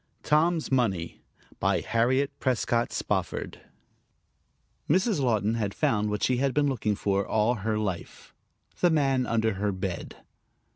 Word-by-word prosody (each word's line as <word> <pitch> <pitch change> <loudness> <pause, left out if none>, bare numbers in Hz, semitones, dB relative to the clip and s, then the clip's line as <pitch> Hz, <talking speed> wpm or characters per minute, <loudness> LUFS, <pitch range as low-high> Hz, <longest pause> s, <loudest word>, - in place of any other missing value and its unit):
TOM'S 160 +1 +2
MONEY 95 -10 0 0.4
BY - - +1
HARRIET 125 +5 +1
PRESCOTT 120 -2 0
SPOFFORD - - -3 1.3
Mrs. 185 +3 +2
Laughton 110 -5 +1
had 105 -3 -2
found 105 -1 +1
what 105 0 -2
she 125 - +2
had 135 0 0
been 150 - +3
looking 110 -6 0
for 100 0 0
all 110 +4 +1
her 110 +1 0
life 95 -5 -5 0.5
the 175 - +4
man 135 -5 +2
under 110 -1 +1
her 100 +2 -1
bed. 95 -2 -5
115 Hz, 135 wpm, -27 LUFS, 105-135 Hz, 1.3 s, the